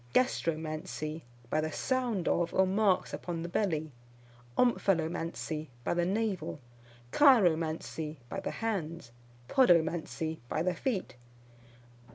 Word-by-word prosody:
Gastromancy, 155 Hz, -7 st, -1 dB, 0.3 s
by 155 Hz, -, +2 dB
the 155 Hz, 0 st, -2 dB
sound 245 Hz, -, -1 dB
of, 170 Hz, -1 st, +1 dB
or 190 Hz, -, +5 dB
marks 195 Hz, 0 st, +2 dB
upon 170 Hz, -2 st, -4 dB
the -, -, -3 dB
belly. 160 Hz, -5 st, -1 dB, 0.7 s
Omphalomancy, 165 Hz, -8 st, 0 dB, 0.2 s
by -, -, 0 dB
the 175 Hz, 0 st, +1 dB
navel. 200 Hz, -5 st, -1 dB, 0.5 s
Chiromancy, 165 Hz, -, +3 dB
by 195 Hz, -, -4 dB
the -, -, -3 dB
hands. 170 Hz, -, -3 dB, 0.4 s
Podomancy, 165 Hz, -7 st, +2 dB
by 155 Hz, -, 0 dB
the 180 Hz, 0 st, +1 dB
feet. 190 Hz, -, -3 dB
170 Hz, 110 wpm, -31 LUFS, 160-200 Hz, 0.7 s, or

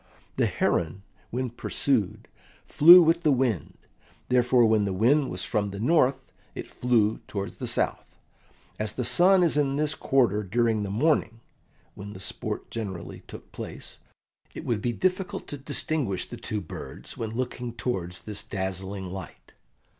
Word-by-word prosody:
The -, -, +3 dB
heron, 85 Hz, +3 st, -1 dB, 0.3 s
when 125 Hz, 0 st, -3 dB
pursued, 120 Hz, -3 st, -1 dB, 0.4 s
flew 175 Hz, +4 st, +9 dB
with 165 Hz, +1 st, +3 dB
the 155 Hz, -, +3 dB
wind; 125 Hz, -, 0 dB, 0.5 s
therefore 125 Hz, -1 st, +4 dB
when 110 Hz, -1 st, +3 dB
the 95 Hz, -, -1 dB
wind 130 Hz, +8 st, +3 dB
was -, -, -4 dB
from 105 Hz, -3 st, -1 dB
the 100 Hz, 0 st, -7 dB
north 135 Hz, +1 st, +3 dB, 0.4 s
it -, -, -6 dB
flew 115 Hz, -3 st, +1 dB
towards 100 Hz, -1 st, -5 dB
the -, -, -5 dB
south; -, -, -2 dB, 0.6 s
as 105 Hz, -1 st, -2 dB
the 125 Hz, -, -3 dB
sun 180 Hz, +9 st, +5 dB
is 165 Hz, -3 st, +2 dB
in 140 Hz, -2 st, +1 dB
this 150 Hz, +1 st, 0 dB
quarter 120 Hz, -6 st, +2 dB
during 110 Hz, +2 st, +1 dB
the 100 Hz, -, -3 dB
morning 115 Hz, 0 st, +1 dB, 0.5 s
(when 100 Hz, +1 st, -9 dB
the 95 Hz, -, -10 dB
sport 90 Hz, -, -5 dB
generally 95 Hz, -7 st, -6 dB
took -, -, -11 dB
place), -, -, -8 dB, 0.6 s
it -, -, -7 dB
would 115 Hz, -4 st, -1 dB
be 120 Hz, -, 0 dB
difficult 185 Hz, -, -1 dB
to 145 Hz, -, -5 dB
distinguish 140 Hz, -, -1 dB
the -, -, -8 dB
two 105 Hz, -1 st, -3 dB
birds 80 Hz, -, -8 dB
when 115 Hz, -, -4 dB
looking 125 Hz, +1 st, -4 dB
towards 95 Hz, -6 st, -4 dB
this 105 Hz, -1 st, -4 dB
dazzling 95 Hz, -1 st, -4 dB
light. 95 Hz, -3 st, -9 dB
115 Hz, 155 wpm, -26 LUFS, 100-135 Hz, 0.6 s, flew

